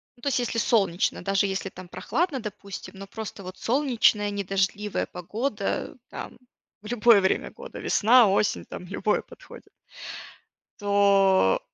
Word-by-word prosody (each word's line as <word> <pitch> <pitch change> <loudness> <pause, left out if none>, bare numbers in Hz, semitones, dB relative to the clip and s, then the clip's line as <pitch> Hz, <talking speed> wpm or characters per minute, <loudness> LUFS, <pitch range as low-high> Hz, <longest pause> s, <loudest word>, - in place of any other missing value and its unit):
ну, 240 - -24
то 280 - 0
есть 255 - +1
если 235 -1 -2
солнечно, 195 -8 +1
даже 195 +1 +2
если 195 0 -3
там 185 0 -11
прохладно, 275 - -1
допустим, 200 -2 -8
но 195 - -8
просто 210 -2 -7
вот 185 +1 -9
солнечная, 230 -5 +2
не 200 0 -3
дождливая 195 +2 -1
погода, 210 +4 -3
там - - -8 0.5
любое 230 -1 +5
время 190 - 0
года, - - -10
весна-осень, 215 -3 +4
там 180 - -8
любое 205 +3 0
подходит. - - -14 1.1
То 200 - +4
205 Hz, 135 wpm, -26 LUFS, 195-230 Hz, 1.1 s, любое